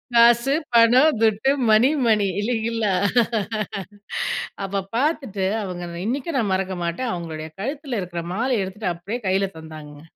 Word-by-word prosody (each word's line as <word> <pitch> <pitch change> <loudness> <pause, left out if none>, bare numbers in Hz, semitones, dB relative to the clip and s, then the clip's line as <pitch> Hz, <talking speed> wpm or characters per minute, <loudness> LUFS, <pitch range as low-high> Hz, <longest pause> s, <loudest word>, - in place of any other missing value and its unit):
காசு, 235 +3 +5 0.2
பணம், 245 +4 +6
துட்டு 220 +4 +3 0.2
மணி, 220 +5 +6 0.2
மணி, 210 -3 +3
இல்லைங்களா. 225 -2 0 1.7
அப்போ 195 0 -1 0.2
பார்த்துட்டு 260 -9 0 0.2
அவங்க 180 -2 -5 0.2
இன்னைக்கும் 275 +5 -2
நான் 205 -5 0
மறக்க 190 -1 -1
மாட்டே 170 +10 -2
அவங்களுடைய 160 -2 -5
கழுத்துல 270 -1 -3
இருக்கிற 175 -1 -5
மாலை 250 +4 0
எடுத்துட்டு 190 0 -3
அப்டியே 200 +8 -5
கைல 195 +1 +2
தந்தாங்கங்க. 155 -2 -11
215 Hz, 125 wpm, -23 LUFS, 185-245 Hz, 1.7 s, பணம்